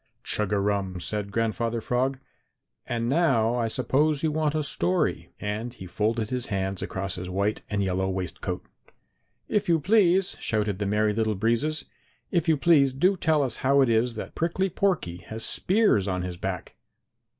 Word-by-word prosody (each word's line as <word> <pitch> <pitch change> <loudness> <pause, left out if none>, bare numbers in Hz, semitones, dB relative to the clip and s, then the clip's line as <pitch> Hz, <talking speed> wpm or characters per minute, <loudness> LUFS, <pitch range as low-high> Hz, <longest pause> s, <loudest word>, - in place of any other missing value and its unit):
"Chug 105 -2 -1
a 105 - +2
rum!" 100 -2 -1
said 100 +3 -4
Grandfather 115 +1 -1
Frog, 130 +4 0 0.7
"and 115 -1 -1
now 130 -6 +3
I 120 -2 0
suppose 140 +6 +1
you 160 - +2
want 155 0 0
a 155 - 0
story." 95 -10 0
And 110 +4 -4
he 95 - -9
folded 110 +4 -1
his 125 -1 -2
hands 95 -2 -2
across 95 -1 -3
his 90 +1 -5
white 100 +3 -1
and 100 -1 0
yellow 95 0 0
waistcoat. 95 -2 -4 0.8
"If 205 -4 0
you 165 -1 +4
please!" 190 +1 +3
shouted 105 -3 -1
the 100 - -1
Merry 105 +1 +2
Little 110 0 0
Breezes. 120 +9 0 0.5
"If 170 -1 +1
you 160 - +4
please, 140 -3 +4
do 180 +9 +3
tell 160 -4 +2
us 125 -4 -2
how 140 +1 +3
it 130 - +3
is 115 +1 +2
that 110 - -6
Prickly 175 +3 0
Porky 175 - 0
has 110 0 -4
spears 190 - +3
on 90 -2 -1
his 90 -1 -4
back!" 90 0 -5
115 Hz, 175 wpm, -26 LUFS, 100-150 Hz, 0.8 s, you